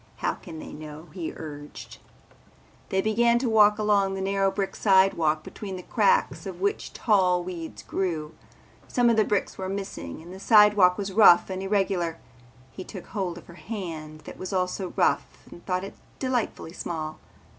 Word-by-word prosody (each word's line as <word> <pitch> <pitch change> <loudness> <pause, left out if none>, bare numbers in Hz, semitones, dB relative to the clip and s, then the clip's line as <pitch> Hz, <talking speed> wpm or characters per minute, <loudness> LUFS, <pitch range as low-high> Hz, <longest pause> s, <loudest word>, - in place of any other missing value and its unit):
How - - -1
can 165 -3 -10
they - - -9
know?" 155 +2 -10
he 175 -4 -4
urged. 145 -2 -9 0.9
They 190 - +1
began 235 +2 +3
to 245 +1 -1
walk 210 -2 +5
along 200 -2 +2
a - - -3
narrow 195 0 +1
brick 195 0 -3
sidewalk 190 -6 +3
between 195 +2 -7
the 180 - -7
cracks 475 - +1
of - - -7
which 405 +2 -1
tall 185 -5 +2
weeds 175 -2 -7
grew. 165 -5 -3 0.5
Some 245 -1 +3
of - - +2
the 215 - +4
bricks 205 -1 -1
were 190 0 -3
missing 195 - -5
and 170 +3 -11
the 190 - -9
sidewalk 210 -4 +6
was 200 -2 -4
rough 190 -3 +6
and 190 0 -3
irregular. 190 -4 0 0.5
He 190 - -8
took 190 -1 -9
hold 185 -5 -3
of 175 - -12
her 170 - -13
hand 165 -7 -7
that - - -11
was 185 - -5
also 185 0 -1
rough - - 0
and 175 - -12
thought 185 -1 0
it 195 - -7 0.2
delightfully 245 -10 -2
small. 155 -4 -5
190 Hz, 175 wpm, -26 LUFS, 170-205 Hz, 0.9 s, sidewalk